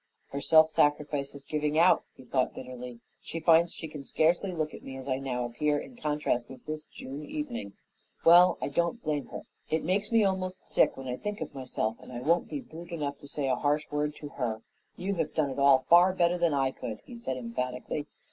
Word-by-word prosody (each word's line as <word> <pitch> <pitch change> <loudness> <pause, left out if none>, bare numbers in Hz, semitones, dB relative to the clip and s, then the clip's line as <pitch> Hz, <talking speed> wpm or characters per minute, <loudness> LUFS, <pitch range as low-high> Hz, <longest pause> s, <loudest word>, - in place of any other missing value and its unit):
"Her 140 - -4
self 160 +1 +6
sacrifice 145 -2 +1
is 140 - -10
giving 150 0 -1
out," 175 +3 +5
he - - -14
thought 130 0 0
bitterly. 125 -2 -8 0.2
"She 165 - -5
finds 165 +1 +5
she 160 - -7
can 150 -2 -8
scarcely 170 +7 +2
look 155 -3 -2
at - - -9
me 135 0 -8
as 130 0 -8
I 130 -1 0
now 125 -3 -2
appear 145 +5 0
in 245 - -7
contrast 150 - -1
with 130 -2 -12
this 155 0 -5
June 140 +3 -8
evening. 245 - -5 0.5
Well, 175 +2 +8
I - - -2
don't 170 +10 0
blame 150 -3 -1
her. - - -7 0.3
It 160 0 0
makes 195 +6 0
me 225 -2 +5
almost 190 -1 -1
sick - - +3
when 135 -1 -7
I 125 0 -2
think 210 0 -4
of - - -5
myself 125 -4 -2
and - - -12
I 120 - -5
won't 165 +7 +2
be 290 - -4
brute 170 -8 -11
enough 145 -5 -3
to 145 - -12
say 140 -1 -2
a 130 - +2
harsh 150 +2 0
word 150 0 -1
to 145 - -8
her." 115 -5 -3 0.3
"You 190 +3 -2
have - - -2
done 150 -4 +1
it 135 - -5
all 140 -2 +5
far 175 +2 +7
better 175 -1 +2
than 170 -4 +2
I 135 -1 +2
could," 110 -4 -6
he 245 - -10
said 130 - -4
emphatically. 125 +4 -4
150 Hz, 225 wpm, -29 LUFS, 130-170 Hz, 0.5 s, Well